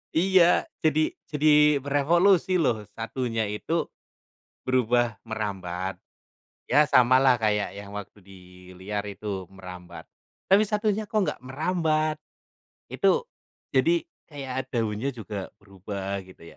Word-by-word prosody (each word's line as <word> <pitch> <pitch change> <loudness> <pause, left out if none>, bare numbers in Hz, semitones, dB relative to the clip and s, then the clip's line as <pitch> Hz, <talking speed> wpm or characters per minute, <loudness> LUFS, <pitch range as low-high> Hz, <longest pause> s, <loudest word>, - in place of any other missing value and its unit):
Iya, 180 0 +4 0.2
jadi 155 0 +2 0.2
jadi 150 -1 +4
merevolusi 175 +6 +3
loh 115 -8 +1
satunya 115 0 -2
itu 160 +11 -2 0.8
berubah 120 -3 +1
merambat, 95 -4 -4 0.7
ya 145 +4 +6
samalah 130 0 +5
kayak 105 -2 0
yang 100 0 -9
waktu 105 0 -8
di 95 0 -14 0.4
liar 100 +2 -4
itu 100 -2 -5
merambat, 90 -2 -10 0.5
tapi 205 +3 +6
satunya 210 0 0
kok 215 0 +1
nggak - - -2
merambat, 155 +1 0 0.7
itu 475 - +2 0.5
jadi 340 0 +2 0.2
kayak 130 -4 -5
daunnya 115 +2 -1
juga 105 -4 -7
berubah 100 0 -5
gitu 95 - -16
125 Hz, 110 wpm, -26 LUFS, 105-155 Hz, 0.8 s, ya